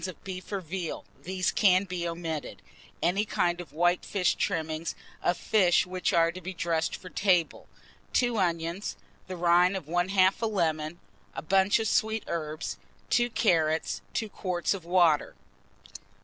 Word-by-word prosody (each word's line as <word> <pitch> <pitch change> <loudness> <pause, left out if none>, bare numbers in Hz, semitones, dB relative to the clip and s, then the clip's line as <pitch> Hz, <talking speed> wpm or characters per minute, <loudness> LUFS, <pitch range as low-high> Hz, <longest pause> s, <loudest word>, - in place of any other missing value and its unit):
of 185 - -10
beef 185 0 -7
or 200 -2 -2
veal 175 0 -5 0.2
(these 185 0 -1
can 185 -2 +4
be 180 -3 -3
omitted), 165 -2 -5 0.4
any 195 +4 +2
kind 175 -4 0
of 175 - -12
white 175 +2 +2
fish 190 -4 +1
trimmings, 160 0 -2 0.3
of 175 - +1
fish 180 -5 +3
which 185 0 -1
are 165 0 +3
to 185 +2 -9
be 185 +2 -6
dressed 165 -1 -1
for 185 - -11
table, 180 -3 +1 0.5
2 245 -2 +2
onions, 170 +1 -1 0.3
the 185 -1 -6
rind 175 +2 +4
of 180 - -7
1/2 185 +4 +2
a - - +1
lemon, 165 -5 -1 0.4
a - - -5
bunch 190 +4 +3
of 225 -1 -1
sweet 220 +2 +1
herbs, 155 -1 -4 0.3
2 240 0 +3
carrots, 160 -8 +1
2 220 - 0
quarts 180 -4 -1
of 185 -4 -7
water. 170 -4 +3
180 Hz, 155 wpm, -28 LUFS, 165-190 Hz, 0.5 s, can